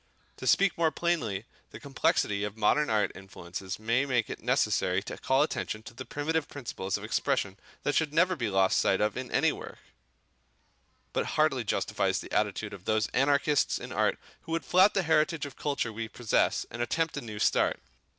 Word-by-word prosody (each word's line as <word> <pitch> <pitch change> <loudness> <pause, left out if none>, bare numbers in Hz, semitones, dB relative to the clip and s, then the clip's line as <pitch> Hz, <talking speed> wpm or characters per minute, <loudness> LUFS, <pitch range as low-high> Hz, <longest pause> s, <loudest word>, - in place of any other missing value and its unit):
To - - -6
speak 195 -3 +3
more 165 -1 +4
plainly, 135 - -1 0.2
the - - -10
complexity 105 -7 0
of 105 +1 -4
modern 145 +8 +2
art 105 -1 +2
influences 95 0 -7
may 115 +4 +1
make 125 -5 0
it - - -7
necessary 90 +1 +1
to - - -6
call 135 +2 +3
attention 110 -7 -3
to 120 - -11
the 130 +2 -8
primitive 155 +1 -1
principles 100 -8 -4
of 105 - -10
expression 110 -3 0 0.3
that 145 - +1
should 155 -1 +1
never 180 +4 +3
be 120 -8 -2
lost 95 -1 +3
sight 95 - +2
of 105 0 +1
in 130 0 -5
any - - +3
work, - - -8 1.4
but - - 0
hardly - - +3
justifies - - 0
the - - -9
attitude - - -1
of 95 -1 -11
those 110 0 +1
anarchists 140 +1 +2
in - - -8
art - - +1 0.2
who 165 - -6
would 165 - -1
flout 190 +3 +5
the 195 - +2
heritage 160 -1 +2
of 140 - -9
culture 140 -6 -2
we 115 +1 -4
possess 110 0 +1
and 120 - -5
attempt 160 +6 0
a - - -3
new 110 -3 -7
start. 105 - +2
125 Hz, 190 wpm, -29 LUFS, 105-150 Hz, 1.4 s, flout